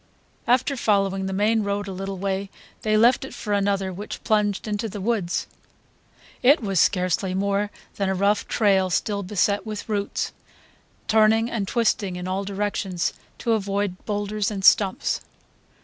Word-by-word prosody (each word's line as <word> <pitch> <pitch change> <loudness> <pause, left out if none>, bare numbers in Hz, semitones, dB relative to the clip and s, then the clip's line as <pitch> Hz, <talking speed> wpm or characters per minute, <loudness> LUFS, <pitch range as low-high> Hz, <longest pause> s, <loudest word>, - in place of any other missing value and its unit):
After 255 +3 +3
following 195 -4 +1
the - - -3
main 215 +3 +2
road 200 0 -2
a - - -4
little 195 +1 -5
way 195 +1 -2 0.3
they 215 0 +2
left 240 +4 +4
it 265 - -8
for 210 - -3
another 195 -2 0
which 205 +4 -7
plunged 210 -1 +1
into 210 +1 -2
the 205 - -6
woods. 195 -4 -1 1.0
It 280 +5 +6
was 195 -6 0
scarcely 185 +1 +1
more 200 +1 0 0.3
than 195 -1 0
a 190 - 0
rough 200 +2 +1
trail, 195 -4 +2
still 200 +3 0
beset 200 +1 0
with 215 -2 -6
roots, 205 -2 -2 0.8
turning 220 +1 +4
and 205 -4 -2
twisting 210 -4 0
in 180 0 -5
all 190 +2 -1
directions 195 -3 -2 0.2
to 235 - -1
avoid 200 -3 -1
boulders 205 -1 -1
and 195 -3 -3
stumps. 195 -3 +4
200 Hz, 155 wpm, -24 LUFS, 195-215 Hz, 1.0 s, It